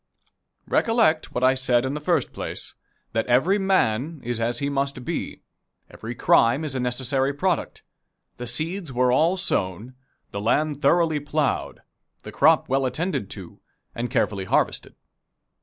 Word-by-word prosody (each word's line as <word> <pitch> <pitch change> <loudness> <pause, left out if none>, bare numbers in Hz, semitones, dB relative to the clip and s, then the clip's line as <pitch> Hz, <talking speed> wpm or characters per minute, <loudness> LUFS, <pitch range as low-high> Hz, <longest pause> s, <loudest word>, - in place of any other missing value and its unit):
Recollect 225 -9 +2
what 125 - -1
I 130 +1 +5
said 130 -2 +1
in 130 - -2
the 150 - -3
first 160 -3 0
place - - -5 0.4
that 115 0 0
every 150 +12 +3
man 160 - +1
is 120 -1 -2
as 120 +1 0
he 140 - 0
must 140 -2 -2
be. - - -4 0.5
Every 115 +2 -7
crime 120 +7 +3
is 145 - -3
a 130 - -2
necessary 130 +2 0
product. 180 +2 -1 0.5
The 125 - -6
seeds 160 +7 -2
were 125 0 +2
all 165 +8 +3
sown, 105 - -1 0.4
the 100 - -4
land 145 +6 0
thoroughly 160 +1 +3
plowed, 145 -1 -2 0.4
the - - -8
crop - - +4
well 135 0 +1
attended 140 - -2
to, 90 -4 -11 0.3
and 120 +1 -3
carefully 105 -6 0
harvested. - - 0
135 Hz, 150 wpm, -24 LUFS, 120-155 Hz, 0.5 s, I